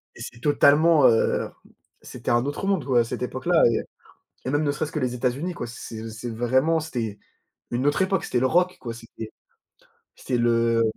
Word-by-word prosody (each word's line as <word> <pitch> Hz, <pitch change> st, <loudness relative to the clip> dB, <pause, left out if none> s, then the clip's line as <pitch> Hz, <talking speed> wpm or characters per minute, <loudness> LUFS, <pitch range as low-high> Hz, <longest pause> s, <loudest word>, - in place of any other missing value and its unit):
et -, -, -12 dB
c'est 120 Hz, -, -8 dB
totalement, 150 Hz, +1 st, +5 dB
heu, 115 Hz, -1 st, +2 dB, 0.5 s
c'était -, -, -5 dB
un 120 Hz, +2 st, +2 dB
autre 145 Hz, +7 st, -3 dB
monde, 190 Hz, -9 st, 0 dB
quoi, 125 Hz, -3 st, +3 dB
à -, -, +2 dB
cette 115 Hz, -, -5 dB
époque-là 160 Hz, +7 st, +1 dB, 0.8 s
et 130 Hz, -, -3 dB
même 145 Hz, +2 st, +1 dB
ne 145 Hz, -, +1 dB
serait-ce 150 Hz, +1 st, -3 dB
que -, -, -5 dB
les 125 Hz, -2 st, -1 dB
États-Unis, 135 Hz, +8 st, -2 dB
quoi, 120 Hz, -, -6 dB
c'est 115 Hz, -1 st, -8 dB
c'est 115 Hz, +2 st, -7 dB
vraiment, 130 Hz, +8 st, +1 dB
c'était 115 Hz, -9 st, -4 dB, 0.5 s
une 125 Hz, +3 st, -1 dB
autre 145 Hz, -, +2 dB
époque, 190 Hz, -1 st, 0 dB
c'était 125 Hz, -, 0 dB
le 130 Hz, -, +3 dB
rock, 180 Hz, +4 st, +2 dB
quoi, 120 Hz, -, -5 dB
c'était 115 Hz, -1 st, -10 dB, 0.9 s
c'était 125 Hz, -2 st, -2 dB
le 115 Hz, -1 st, +2 dB
130 Hz, 185 wpm, -24 LUFS, 120-155 Hz, 0.9 s, totalement